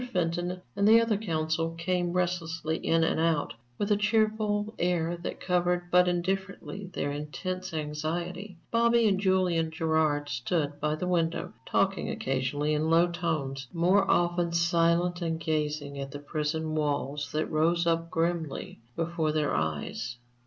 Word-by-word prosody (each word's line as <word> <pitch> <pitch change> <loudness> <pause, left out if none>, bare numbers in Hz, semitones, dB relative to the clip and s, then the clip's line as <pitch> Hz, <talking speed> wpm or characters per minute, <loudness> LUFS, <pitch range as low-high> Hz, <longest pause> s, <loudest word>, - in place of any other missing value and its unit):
Fenton 175 0 -1 0.2
and 200 - +3
the 225 +1 +8
other 230 -2 +2
counsel 165 -4 -1
came 175 +1 0
restlessly 165 -3 -1
in 165 0 +2
and 160 - +1
out, 160 -5 +1 0.2
with 205 +1 -1
a - - +6
cheerful 215 0 +1
air 175 -1 +1
that 170 - -6
covered 180 -1 0
but 180 0 +6
indifferently 190 +2 -2
their 145 - -1
intense 185 +6 -4
anxiety; 170 +5 -4
Bobby 235 0 +4
and 195 -2 +2
Julian 185 -4 +2
Gerard 160 -2 +1
stood 145 +3 -1
by 150 0 0
the 170 - -3
window, 170 -2 0
talking - - +1
occasionally 135 +3 -1
in 155 +1 +1
low 170 +2 +5
tones, 150 -6 -2
more 185 +3 +3
often 175 -1 +2
silent 170 +1 +2
and 165 -1 -1
gazing 150 -2 -2
at 135 0 -4
the 140 - -7
prison 155 +1 -2
walls 145 -1 -1
that 155 +1 +1
rose 165 +2 +2
up 165 0 +1
grimly 165 -3 -2 0.2
before 165 -2 0
their 150 -1 0
eyes. 80 +11 -2
165 Hz, 145 wpm, -28 LUFS, 155-180 Hz, 0.2 s, the